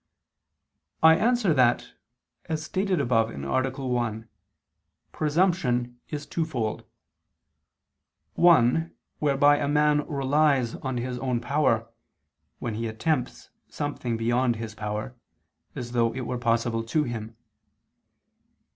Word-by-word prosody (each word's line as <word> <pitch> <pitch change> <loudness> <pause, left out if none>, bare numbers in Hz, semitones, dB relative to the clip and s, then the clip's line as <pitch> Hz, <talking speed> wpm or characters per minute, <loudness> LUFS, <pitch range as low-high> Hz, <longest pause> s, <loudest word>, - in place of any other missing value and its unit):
I 160 0 +8
answer 230 -4 +2
that, 125 -3 +2 0.5
As 160 -2 -3
stated 185 +2 -1
above 115 -4 +2
(A. 70 - -1 0.2
1), 115 -3 -2 0.8
presumption 150 -7 0
is 150 -1 -5
twofold; 135 -10 -3 1.5
one 165 -1 +4 0.2
whereby 145 0 +4
a 145 - -1
man 150 0 +3
relies 140 -3 +2
on 130 -2 -4
his 125 +1 -3
own 125 -2 -1
power, 120 -3 +1 0.7
when 115 - -4
he 115 +2 -3
attempts 125 +4 -2 0.2
something 130 -5 -3
beyond 120 +2 +1
his 110 -1 -6
power, 105 +3 -5 0.6
as 120 -1 -6
though 115 -1 +2
it 130 - -3
were 125 +1 -3
possible 115 -1 0
to 125 +7 0
him. 115 -3 -6
125 Hz, 110 wpm, -26 LUFS, 115-150 Hz, 1.5 s, I